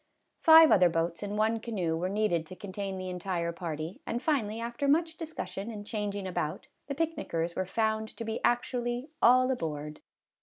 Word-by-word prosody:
Five 320 -1 +8
other 180 -3 +6
boats 165 0 -1
and 205 0 -3
one 220 +1 +2
canoe 190 -8 -2
were 175 +3 -1
needed 195 -6 0
to 185 - -9
contain 195 0 -5
the 185 0 -4
entire 180 -2 -2
party, 165 0 -5
and 235 - -2
finally, 240 -6 0
after 235 +4 -2
much 320 +3 +2
dis 325 -1 -7
cussion 195 - -5
and 205 -2 -7
changing 205 -2 -3
about, 155 -4 -3 0.2
the 280 - -3
picnickers 175 - -2
were 185 - -2
found 220 +1 0
to 230 - -5
be 220 0 -4
actually 240 +2 0
" - - -46
all 255 +2 +6
aboard." 150 - -4
210 Hz, 185 wpm, -30 LUFS, 175-240 Hz, 0.2 s, Five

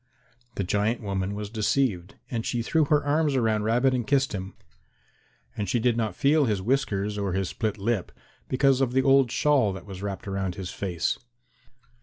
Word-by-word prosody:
The 100 - -1
giant 105 +5 0
woman 100 -1 -2
was 105 0 -5
deceived, 105 -4 0 0.2
and 115 -2 -2
she 120 0 -1
threw 160 +5 +2
her 150 0 +2
arms 150 0 +2
around 110 -4 +1
Rabbit 125 +4 +3
and 120 -3 -1
kissed 135 -2 +2
him, 95 -1 -5 1.0
and 100 -3 -3
she 120 - +1
did 120 0 +2
not 110 -5 -1
feel 145 +5 +3
his 105 -5 0
whiskers 105 -3 -1
or 100 -3 -1
his 95 -1 -1
split 110 -1 -2
lip 105 -1 -1 0.4
because 135 0 +3
of 125 -2 +1
the 130 0 +3
old 135 -2 +5
shawl 130 -4 +2
that 95 -2 -9
was 95 -2 -8
wrapped 100 +2 -5
around 95 -2 -2
his 95 -2 -6
face. 90 -4 -2
110 Hz, 185 wpm, -26 LUFS, 100-130 Hz, 1.0 s, old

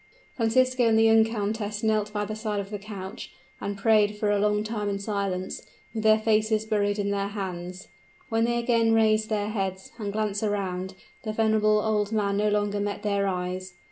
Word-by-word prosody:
Francisco 255 +2 +2
and 220 -1 +4
the 225 - +5
young 225 0 +6
countess 210 -1 -3
knelt 215 -1 +1
by 210 0 -2
the 215 +1 -5
side 215 -1 -2
of 200 +1 -6
the 205 - -4
couch, 200 0 -8 0.3
and 200 0 -3
prayed 210 0 +3
for 210 0 +1
a 205 - +2
long 210 0 +2
time 215 -2 -3
in 200 - -1
silence, 200 -2 -3 0.3
with 220 - -2
their 215 0 +5
faces 215 0 +1
buried 205 -1 0
in 200 -1 -1
their 200 0 -1
hands. 185 -2 -6 0.4
When 225 0 +1
they 240 0 0
again 230 -1 +2
raised 215 -1 +3
their 210 -1 -1
heads, 190 -3 -3
and 205 -2 -3
glanced 210 -1 -1
around, 190 -3 -2 0.3
the 215 -2 -4
venerable 215 -1 +3
old 210 -1 0
man 200 -2 0
no 210 +1 +2
longer 205 0 0
met 205 0 -3
their 200 -1 +1
eyes. 185 0 -3
210 Hz, 195 wpm, -26 LUFS, 200-220 Hz, 0.4 s, young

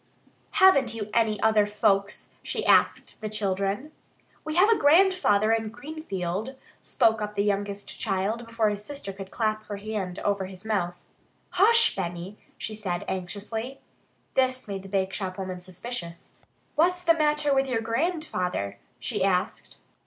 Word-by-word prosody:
"Haven't 275 - +5
you 210 -2 -5
any 220 -2 +2
other 215 -2 +4
folks?" 205 -1 0
she - - -3
asked - - +3
the 215 - -3
children. 200 +5 -1 0.5
"We 310 0 -4
have 365 +4 +6
a 455 - +5
grandfather 295 - +4
in 225 -1 0
Greenfield," 215 - -5 0.3
spoke 220 -1 +2
up 210 0 -4
the 200 - +1
youngest 200 0 -2
child 215 +3 -1
before 230 -2 +1
his 205 0 -2
sister 280 -7 -5
could 195 0 -8
clap 215 -1 -1
her 205 - -4
hand 200 -3 -4
over 200 -2 -1
his 190 +1 -11
mouth. 175 -5 -2 0.5
"Hush, 455 +5 +5
Benny," 180 +2 -5 0.2
she 215 - -5
said 190 -5 -3
anxiously. 210 +7 -4 0.5
This 255 -2 +1
made 195 -1 -4
the 195 - -11
bakeshop 190 -1 -2
woman 185 -2 -5
suspicious. 180 -1 -7 0.4
"What's 355 +3 +2
the 335 -1 +5
matter 300 -2 +2
with 270 0 +2
your 240 -3 0
grandfather?" 225 - -2 0.2
she 125 - -2
asked. 185 -2 -1
210 Hz, 145 wpm, -26 LUFS, 195-260 Hz, 0.5 s, have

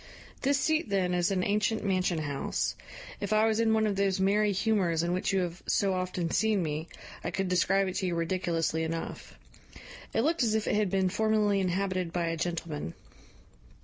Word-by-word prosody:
"This 280 +1 +2
seat, 315 -4 +1
then, 185 -2 +1
is 175 -1 +2
an 190 -2 0
ancient 210 +2 0
mansion 185 -3 +1
house: 145 -3 -2 0.4
if 205 - -4
I 215 +1 +4
was 220 0 +1
in 225 -1 +3
one 220 0 +3
of 205 -2 0
those 195 -1 +1
merry 205 +2 +3
humours 190 -5 +1
in 175 +1 0
which 185 - 0
you 195 -1 +2
have 175 0 -4
so 195 -2 +2
often 185 -2 -2
seen 215 -2 +2
me, 155 +1 -3 0.4
I - - -2
could 195 -1 -2
describe 195 +2 +2
it 185 - -3
to 190 - -1
you 175 - -1
ridiculously 165 -2 0
enough. 160 - -5 0.8
It 225 - +1
looked 320 +5 +1
as 220 -3 +2
if 220 - -1
it - - +1
had 210 -2 +2
been 190 0 +1
formerly 210 0 +2
inhabited 185 -1 -1
by 175 0 -1
a 165 - -1
gentleman. 160 - -4
190 Hz, 195 wpm, -29 LUFS, 175-210 Hz, 0.8 s, I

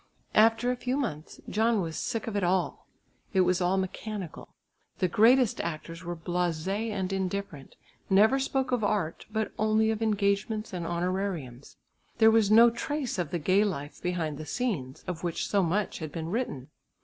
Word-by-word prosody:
After 225 +3 +4
a - - -1
few 250 +2 -2
months 175 - -4
John 225 +1 +2
was 165 -4 -3
sick 225 -3 -3
of 225 - -4
it 200 - 0
all. 180 +1 0 0.5
It 190 - +4
was 180 0 +2
all 180 +2 +2
mechanical. 190 -1 -5 0.4
The 185 - +2
greatest 230 +5 +4
actors 165 +1 -6
were 175 0 -4
blasé 175 +5 -2
and 195 -2 -2
indifferent, 190 -6 -4 0.3
never 215 +7 +5
spoke 265 -1 -1
of 245 -3 +1
art, 200 -6 -1
but 220 0 -1
only 220 +1 +3
of 220 0 -3
engagements 210 0 0
and 170 -2 -3
honorariums. 175 -7 -3 0.4
There 225 -1 +6
was 220 -2 +4
no 230 +2 +7
trace 270 -2 -3
of 170 -4 -1
the 175 - -1
gay 185 +6 +3
life 150 -8 -4
behind 165 -5 -2
the 155 - -6
scenes, 150 - -3
of 180 -2 -5
which 170 -2 -2
so 200 - +2
much 190 +4 -1
had 155 -3 -5
been 165 -1 -5
written. 195 - -3
195 Hz, 175 wpm, -28 LUFS, 170-220 Hz, 0.5 s, no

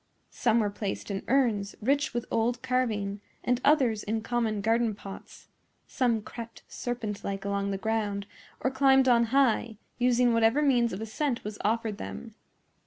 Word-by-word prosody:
Some 230 +1 +2
were 205 -1 0
placed 200 0 -4
in 195 - -2
urns, 230 -7 +1
rich 280 +6 +1
with 240 -1 -3
old 235 +2 0
carving, 215 -6 -1 0.2
and 245 0 +1
others 260 -8 +3
in 220 +2 -2
common 225 -2 -1
garden 225 +1 +1
pots; 195 -1 -11 0.4
some 235 -4 0
crept 230 0 -9
serpent 225 -4 -4
like 195 0 -4
along 200 0 -1
the 195 - -1
ground 210 -1 -1 0.4
or 260 - +1
climbed 265 0 +4
on 235 -2 +5
high, 235 -3 +2 0.2
using 245 -1 +3
whatever 230 +6 +3
means 245 -5 +3
of 190 - -5
ascent 235 +3 -2
was 210 0 -6
offered 220 -1 0
them. 225 -2 -7
230 Hz, 160 wpm, -28 LUFS, 210-250 Hz, 0.4 s, on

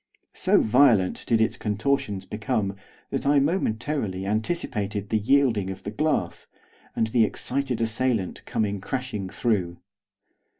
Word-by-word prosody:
So - - +3
violent 110 -5 +4
did 115 -2 +3
its 110 +1 +1
contortions 105 -2 -1
become 105 -2 -2 0.4
that - - -2
I 145 +1 +5
momentarily 125 - -1
anticipated 105 - -2
the 110 - +2
yielding 115 -4 +2
of 95 - -7
the 105 - -4
glass, 155 +6 -1 0.5
and 110 - +2
the 110 +1 +3
excited 130 +3 -1
assailant 115 -3 -1
coming 100 -3 -1
crashing 125 -6 -4
through. 95 -5 -1
110 Hz, 125 wpm, -25 LUFS, 100-130 Hz, 0.5 s, I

